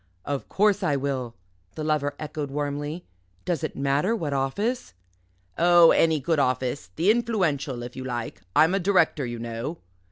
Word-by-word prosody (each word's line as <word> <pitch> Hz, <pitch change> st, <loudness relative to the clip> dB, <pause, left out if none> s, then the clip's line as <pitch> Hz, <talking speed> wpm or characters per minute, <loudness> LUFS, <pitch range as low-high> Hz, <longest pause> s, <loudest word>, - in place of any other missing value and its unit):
"Of 140 Hz, -1 st, -3 dB
course 205 Hz, 0 st, +2 dB
I 150 Hz, -6 st, +1 dB
will," 130 Hz, -4 st, -3 dB, 0.4 s
the 155 Hz, -, -4 dB
Lover 150 Hz, -2 st, 0 dB
echoed 150 Hz, -1 st, -5 dB
warmly; 145 Hz, +3 st, -3 dB, 0.4 s
"does 170 Hz, -5 st, -1 dB
it -, -, -3 dB
matter 140 Hz, +10 st, +1 dB
what 160 Hz, -9 st, -3 dB
office?" 140 Hz, -, -2 dB, 0.6 s
"Oh, 175 Hz, -1 st, +7 dB
any 160 Hz, -2 st, +3 dB
good 160 Hz, +3 st, 0 dB
office 130 Hz, 0 st, -1 dB
the 175 Hz, +6 st, +4 dB
Influential, 175 Hz, -, 0 dB
if 120 Hz, 0 st, -8 dB
you 130 Hz, -, -6 dB
like. 120 Hz, -6 st, -5 dB
I'm 160 Hz, +4 st, +5 dB
a 195 Hz, -, +2 dB
director, 170 Hz, -7 st, +2 dB
you 120 Hz, 0 st, -5 dB
know." 115 Hz, +7 st, -5 dB
145 Hz, 160 wpm, -25 LUFS, 135-175 Hz, 0.6 s, Oh